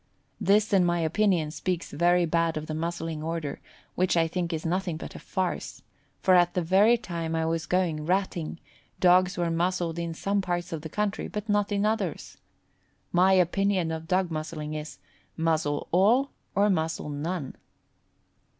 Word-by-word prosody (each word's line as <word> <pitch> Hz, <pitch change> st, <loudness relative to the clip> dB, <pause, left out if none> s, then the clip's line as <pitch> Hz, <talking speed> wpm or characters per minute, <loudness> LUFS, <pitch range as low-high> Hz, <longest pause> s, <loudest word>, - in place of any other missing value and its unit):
This 210 Hz, +1 st, +3 dB
in 190 Hz, -2 st, +5 dB
my 175 Hz, 0 st, +1 dB
opinion, 165 Hz, -2 st, +1 dB
speaks 175 Hz, +3 st, -3 dB
very 175 Hz, +3 st, +3 dB
bad 165 Hz, 0 st, +1 dB
of 155 Hz, -, -4 dB
the 155 Hz, -, -5 dB
Muzzling 165 Hz, -1 st, -3 dB
Order, 160 Hz, -2 st, -4 dB, 0.3 s
which 185 Hz, -1 st, +1 dB
I 165 Hz, -1 st, +3 dB
think 175 Hz, +1 st, -2 dB
is 160 Hz, 0 st, -3 dB
nothing 175 Hz, -1 st, -1 dB
but -, -, -8 dB
a -, -, -9 dB
farce, 185 Hz, -3 st, -3 dB, 0.4 s
for 185 Hz, -, +4 dB
at 175 Hz, -1 st, +4 dB
the 180 Hz, -, +1 dB
very 200 Hz, +7 st, +5 dB
time 170 Hz, -7 st, -4 dB
I 160 Hz, 0 st, 0 dB
was 165 Hz, 0 st, -1 dB
going 165 Hz, -4 st, 0 dB
ratting, 180 Hz, -3 st, -1 dB, 0.4 s
dogs 180 Hz, 0 st, +4 dB
were 170 Hz, -1 st, 0 dB
muzzled 170 Hz, 0 st, -1 dB
in 170 Hz, -1 st, -3 dB
some 200 Hz, +4 st, 0 dB
parts 175 Hz, -1 st, -3 dB
of 160 Hz, -, -4 dB
the 160 Hz, -, -7 dB
country 210 Hz, +3 st, -2 dB
but 210 Hz, +1 st, -5 dB
not 205 Hz, -1 st, +1 dB
in 200 Hz, 0 st, +1 dB
others. 210 Hz, -7 st, -2 dB, 0.7 s
My 185 Hz, +2 st, +4 dB
opinion 185 Hz, -1 st, +2 dB
of 160 Hz, 0 st, -5 dB
dog 185 Hz, 0 st, +1 dB
muzzling 155 Hz, -1 st, -4 dB
is, 155 Hz, 0 st, -6 dB, 0.4 s
muzzle 160 Hz, -3 st, 0 dB
all 225 Hz, +10 st, +4 dB, 0.2 s
or 200 Hz, +1 st, +4 dB
muzzle 160 Hz, -3 st, -1 dB
none. 150 Hz, 0 st, -4 dB
175 Hz, 170 wpm, -27 LUFS, 160-190 Hz, 0.7 s, in